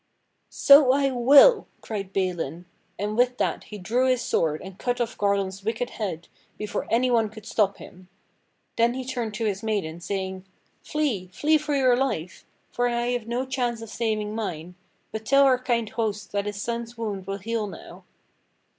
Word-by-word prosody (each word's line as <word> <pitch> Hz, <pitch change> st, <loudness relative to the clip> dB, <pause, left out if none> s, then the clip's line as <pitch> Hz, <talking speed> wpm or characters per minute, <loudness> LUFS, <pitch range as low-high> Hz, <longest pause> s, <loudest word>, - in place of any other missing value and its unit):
"So 280 Hz, -2 st, +7 dB
I 275 Hz, 0 st, +2 dB
will!" 285 Hz, -, +6 dB
cried 200 Hz, -3 st, -5 dB
Balin. 175 Hz, -4 st, -2 dB, 0.3 s
And 210 Hz, +2 st, -2 dB
with 245 Hz, +1 st, +2 dB
that -, -, -1 dB
he 210 Hz, -, -8 dB
drew 240 Hz, +7 st, +1 dB
his 255 Hz, -2 st, +2 dB
sword 155 Hz, -1 st, 0 dB
and 190 Hz, 0 st, -10 dB
cut 245 Hz, -1 st, -1 dB
off 240 Hz, 0 st, -2 dB
Garlon's 200 Hz, -1 st, -1 dB
wicked 225 Hz, +3 st, -2 dB
head 180 Hz, -6 st, -5 dB, 0.3 s
before 210 Hz, 0 st, -4 dB
any 250 Hz, +2 st, +2 dB
one 225 Hz, -3 st, +2 dB
could 215 Hz, -1 st, -12 dB
stop 205 Hz, -3 st, +1 dB
him. 185 Hz, 0 st, -13 dB, 0.7 s
Then 235 Hz, +1 st, +3 dB
he 260 Hz, -1 st, -4 dB
turned 240 Hz, -4 st, -3 dB
to 225 Hz, +2 st, -2 dB
his 200 Hz, -2 st, -1 dB
maiden 200 Hz, -7 st, -2 dB
saying: 190 Hz, 0 st, -4 dB, 0.4 s
"Flee! 275 Hz, -12 st, -1 dB
flee 300 Hz, +12 st, +2 dB
for 295 Hz, -1 st, -2 dB
your 255 Hz, -3 st, +4 dB
life; 215 Hz, -10 st, -3 dB, 0.2 s
for 245 Hz, 0 st, 0 dB
I 240 Hz, 0 st, -1 dB
have 245 Hz, -2 st, -2 dB
no 245 Hz, +3 st, -1 dB
chance 250 Hz, -3 st, -2 dB
of 225 Hz, -, -9 dB
saving 215 Hz, -2 st, -2 dB
mine. 180 Hz, -6 st, -4 dB, 0.4 s
But 220 Hz, 0 st, -5 dB
tell 275 Hz, +5 st, +5 dB
our 260 Hz, -2 st, +4 dB
kind 240 Hz, -3 st, 0 dB
host 210 Hz, -3 st, -3 dB
that 200 Hz, 0 st, -1 dB
his 205 Hz, -1 st, -4 dB
son's 235 Hz, +1 st, -4 dB
wound 205 Hz, -5 st, -4 dB
will 195 Hz, 0 st, -3 dB
heal 220 Hz, +1 st, -2 dB
now!" -, -, -11 dB
225 Hz, 180 wpm, -25 LUFS, 195-245 Hz, 0.7 s, So